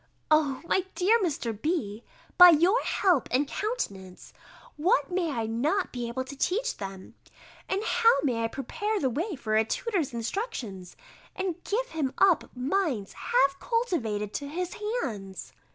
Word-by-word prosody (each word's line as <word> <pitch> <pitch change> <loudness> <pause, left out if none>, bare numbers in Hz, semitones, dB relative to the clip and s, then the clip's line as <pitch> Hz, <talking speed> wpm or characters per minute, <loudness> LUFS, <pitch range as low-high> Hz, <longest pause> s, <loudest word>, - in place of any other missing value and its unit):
O, 285 -4 +3
my 375 +2 +1
dear 425 +6 +4
Mr. 300 - -1
B., 230 - -2 0.3
by 360 -1 +11
your 350 +9 +4
help 360 -9 +2
and 275 +3 +1
countenance, 200 - -5 0.4
what 365 +7 +1
may 355 -2 0
I 235 -6 -2
not 285 - 0
be 240 -2 -3
able 250 +2 -3
to 275 +2 -9
teach 425 - -1
them, 195 -1 -8 0.6
and 390 +2 0
how 460 +1 +4
may 240 -5 0
I - - +2
prepare 410 - -3
the 265 -3 0
way 335 - -2
for 215 -5 -2
a 220 - +5
tutor's 355 - -2
instructions, 230 - -5 0.4
and 370 -3 -3
give - - -1
him 290 -5 -2
up 375 -4 +4
minds 260 - -1
half 275 - +1
cultivated 235 - -1
to 285 - -4
his 350 +4 -4 0.3
hands! 195 -5 -6
295 Hz, 150 wpm, -28 LUFS, 230-380 Hz, 0.6 s, by